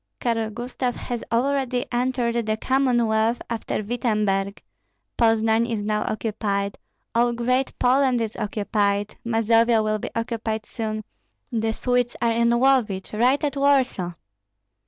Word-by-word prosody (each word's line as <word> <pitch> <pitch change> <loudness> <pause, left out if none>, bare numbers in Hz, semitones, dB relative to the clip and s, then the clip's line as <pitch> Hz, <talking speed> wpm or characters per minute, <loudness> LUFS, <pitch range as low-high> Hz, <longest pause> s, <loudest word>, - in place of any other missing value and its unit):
Karl 225 -2 0
Gustav 245 +2 -3
has 240 -2 -5
already 255 0 +1
entered 240 -2 0
the 215 0 0
Commonwealth 240 -3 +2
after 225 -2 -2
Wittemberg; 210 -4 0 0.6
Poznan 225 0 +3
is 220 -3 -2
now 210 0 0
occupied, 205 -2 -2 0.3
all 240 +1 +3
Great 250 +3 0
Poland 255 0 +3
is 225 -2 -3
occupied, 205 -1 -1
Mazovia 230 0 +3
will 215 0 0
be - - -5
occupied 225 -1 -2
soon; 215 -1 -4 0.5
the 225 -1 0
Swedes 245 +1 0
are 235 - +2
in 235 +1 +2
Lovich, 235 -6 +2
right 250 +7 +2
at 285 -2 0
Warsaw. 265 -10 +2
230 Hz, 125 wpm, -24 LUFS, 215-245 Hz, 0.6 s, Poznan